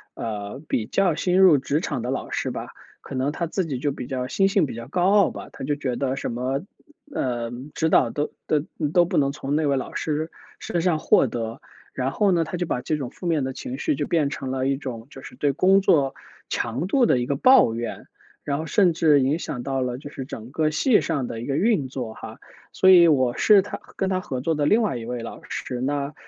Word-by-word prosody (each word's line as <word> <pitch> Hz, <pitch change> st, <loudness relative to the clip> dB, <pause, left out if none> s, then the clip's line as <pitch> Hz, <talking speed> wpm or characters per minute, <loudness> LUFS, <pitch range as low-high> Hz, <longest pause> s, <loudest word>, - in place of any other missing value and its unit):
呃， 105 Hz, +4 st, -5 dB
比 110 Hz, -3 st, -1 dB
较 195 Hz, -4 st, +2 dB
新 180 Hz, +2 st, +1 dB
入 175 Hz, -7 st, +7 dB
职 145 Hz, +3 st, 0 dB
场 135 Hz, -8 st, -3 dB
的 125 Hz, -, -4 dB
老 135 Hz, -, -3 dB
师 -, -, -1 dB
吧， -, -, -6 dB, 0.3 s
可 -, -, -10 dB
能 135 Hz, +3 st, 0 dB
他 170 Hz, +2 st, -3 dB
自 180 Hz, +2 st, -2 dB
己 135 Hz, -4 st, -3 dB
就 145 Hz, +2 st, -1 dB
比 125 Hz, -2 st, -7 dB
较 130 Hz, -2 st, -3 dB
心 195 Hz, +7 st, +2 dB
性 195 Hz, -5 st, +2 dB
比 130 Hz, -, -6 dB
较 115 Hz, +1 st, -7 dB
高 180 Hz, +5 st, +2 dB
傲 205 Hz, -4 st, +5 dB
吧。 -, -, -9 dB
他 -, -, -8 dB
就 145 Hz, +2 st, 0 dB
觉 130 Hz, -4 st, -3 dB
得 135 Hz, 0 st, -1 dB
什 -, -, -3 dB
么， 130 Hz, +4 st, -2 dB, 0.5 s
呃， 120 Hz, -2 st, -1 dB, 0.2 s
指 160 Hz, -, 0 dB
导 120 Hz, -, +4 dB
都 145 Hz, +4 st, -2 dB, 0.2 s
都 150 Hz, -, +2 dB, 0.3 s
都 175 Hz, -1 st, +5 dB
不 175 Hz, 0 st, -2 dB
能 140 Hz, -1 st, +3 dB
从 140 Hz, 0 st, -3 dB
那 155 Hz, -1 st, +1 dB
位 140 Hz, -1 st, +2 dB
老 130 Hz, -, -5 dB
师 155 Hz, +1 st, -2 dB, 0.3 s
身 170 Hz, -, -2 dB
上 170 Hz, -3 st, +1 dB
获 135 Hz, -, +4 dB
得。 115 Hz, -1 st, -5 dB, 0.3 s
然 130 Hz, +1 st, -1 dB
后 205 Hz, -3 st, +2 dB
呢， 165 Hz, -1 st, +2 dB
他 180 Hz, -, -5 dB
就 175 Hz, -, -1 dB
把 125 Hz, -6 st, -2 dB
这 150 Hz, +4 st, -1 dB
种 130 Hz, -4 st, -4 dB
负 180 Hz, -, -11 dB
面 160 Hz, -5 st, +1 dB
的 130 Hz, -, -4 dB
情 260 Hz, -, -6 dB
绪 310 Hz, -3 st, 0 dB
就 -, -, -2 dB
变 160 Hz, -8 st, +1 dB
成 130 Hz, -2 st, -5 dB
了 130 Hz, 0 st, -1 dB
一 135 Hz, -, +2 dB
种 125 Hz, -4 st, -7 dB
就 135 Hz, -, -11 dB
是 -, -, -11 dB
对 145 Hz, -2 st, +1 dB
工 190 Hz, +6 st, +4 dB
作 140 Hz, -8 st, +3 dB, 0.4 s
强 125 Hz, +10 st, -2 dB
度 250 Hz, +3 st, +3 dB
的 -, -, +3 dB
一 120 Hz, -, -1 dB
个 140 Hz, -, -1 dB
抱 255 Hz, -, +6 dB
怨， 115 Hz, 0 st, -5 dB, 0.4 s
然 140 Hz, +1 st, -2 dB
后 160 Hz, -, -5 dB
甚 185 Hz, -5 st, +3 dB
至 155 Hz, -3 st, +4 dB
影 145 Hz, +6 st, +1 dB
响 120 Hz, -6 st, -5 dB
到 135 Hz, -1 st, -1 dB
了 125 Hz, -1 st, -2 dB
就 145 Hz, +1 st, -9 dB
是 135 Hz, -, -6 dB
整 120 Hz, -2 st, -9 dB
个 155 Hz, 0 st, +1 dB
系 210 Hz, -, +3 dB
上 145 Hz, -6 st, -1 dB
的 115 Hz, 0 st, -6 dB
一 -, -, -5 dB
个 140 Hz, +1 st, 0 dB
运 195 Hz, -, +2 dB
作 125 Hz, -4 st, -5 dB
哈。 -, -, -10 dB, 0.3 s
所 190 Hz, -, +4 dB
以 170 Hz, -2 st, +8 dB
我 130 Hz, -5 st, +3 dB
是 205 Hz, -3 st, +6 dB
他 -, -, -6 dB, 0.2 s
跟 190 Hz, -, -1 dB
他 185 Hz, -, +1 dB
合 130 Hz, -6 st, -4 dB
作 160 Hz, +4 st, 0 dB
的 145 Hz, -1 st, 0 dB
另 220 Hz, +6 st, +4 dB
外 200 Hz, -, 0 dB
一 115 Hz, -, -7 dB
位 120 Hz, -1 st, -4 dB
老 -, -, -8 dB
师， 125 Hz, -1 st, -4 dB
那， 140 Hz, +1 st, -2 dB
140 Hz, 265 characters per minute, -24 LUFS, 130-170 Hz, 0.5 s, 以